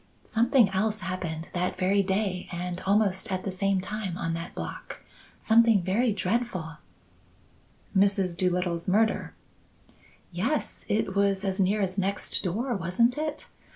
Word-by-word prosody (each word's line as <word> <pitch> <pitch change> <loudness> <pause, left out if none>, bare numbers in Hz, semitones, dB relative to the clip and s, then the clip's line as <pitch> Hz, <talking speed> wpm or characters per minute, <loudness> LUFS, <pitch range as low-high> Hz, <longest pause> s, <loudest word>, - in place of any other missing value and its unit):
Something 235 0 +3
else 210 +3 0
happened 175 -3 -4
that 180 +1 -1
very 195 +2 +3
day 190 -1 -1
and 180 0 -4
almost 200 0 +2
at 185 0 -2
the 195 - -3
same 195 +1 +1
time 190 -2 -4
on 165 -2 -2
that 165 +1 -6
block. - - -7 0.4
Something 225 -3 +5
very 220 +7 +2
dreadful 185 -5 -2 0.6
" - - -32
"Mrs. 195 -2 +2
Doolittle's 180 -1 0
murder?" 215 +4 +1 1.0
"Yes. 230 - -2
It 205 -2 0
was 200 0 +2
as 190 0 -1
near 200 +2 +2
as 190 +1 -2
next 195 +1 0
door, 225 +8 -1
wasn't 195 +7 +2
it? 305 0 -4
195 Hz, 140 wpm, -27 LUFS, 180-215 Hz, 1.0 s, Something